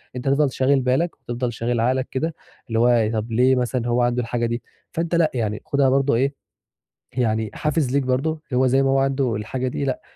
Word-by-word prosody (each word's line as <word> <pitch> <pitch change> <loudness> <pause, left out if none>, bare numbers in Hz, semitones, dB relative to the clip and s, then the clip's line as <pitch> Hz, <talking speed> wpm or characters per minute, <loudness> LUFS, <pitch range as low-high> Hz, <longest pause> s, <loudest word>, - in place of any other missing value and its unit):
أنت 125 +2 -5
هتفضل 140 0 +3
شاغل 135 +2 +2
بالك 130 +7 0
وهتفضل 120 0 -4
شاغل 120 +1 -1
عقلك 130 +3 +1
كده 160 +4 -2 0.3
اللي 115 -1 0
هو 120 -2 +4
طَب 110 +1 -3
ليه 125 +3 +4
مثلًا 125 -1 -1
هو 120 +1 +2
عنده 120 0 +1
الحاجة 120 0 -2
دي؟ 120 0 -2 0.3
فأنت 170 0 -1
لأ، 165 -2 +3
يعني 110 -3 -2
خدها 140 -1 +2
برضه 135 0 +2
إيه، 135 +4 -1 0.7
يعني 110 -3 0
حافز 150 -3 0
ليك 140 - +2
برضه 130 +4 0
اللي 155 -5 -5
هو 130 - +4
زي 135 +2 +3
ما 135 - +2
هو 135 - +3
عنده 135 -3 +1
الحاجة 125 +5 -3
دي 140 - -3
لأ، 130 -2 -2
130 Hz, 215 wpm, -22 LUFS, 120-135 Hz, 0.7 s, هو